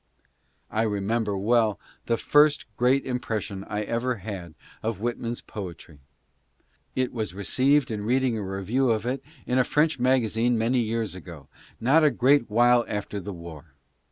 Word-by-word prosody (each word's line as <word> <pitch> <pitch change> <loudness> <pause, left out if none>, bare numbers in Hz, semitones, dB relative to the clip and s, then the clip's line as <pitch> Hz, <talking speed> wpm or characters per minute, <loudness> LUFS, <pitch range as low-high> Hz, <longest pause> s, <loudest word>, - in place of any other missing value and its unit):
I 110 - +1
remember 105 0 0
well 110 +1 +2 0.3
the 115 - +2
first 145 +3 +4
great 125 +4 +2
impression 110 -6 -3
I 105 +1 -3
ever 120 +4 -1
had 95 -6 -7 0.3
of 110 -2 -2
W 120 +4 -2
lkman's 120 +1 -5
poetry. 85 -6 -9 1.0
It 130 -1 0
was 110 -6 -4
received 130 +6 +2
in 105 -2 -3
reading 125 +1 +1
a 110 - -3
review 100 +7 -1
of 110 -1 0
it 130 +2 -2 0.2
in 125 +1 +1
a - - +5
French 150 +3 +1
magazine 120 -2 +2
many 120 +3 +1
years 115 -3 -1
ago, 85 -5 -11 0.3
not 140 +7 +4
a 150 - +6
great 130 -1 +3
while 120 +2 +4
after 105 0 -4
the 100 +2 -6
war. 85 -5 -11
115 Hz, 155 wpm, -26 LUFS, 105-125 Hz, 1.0 s, a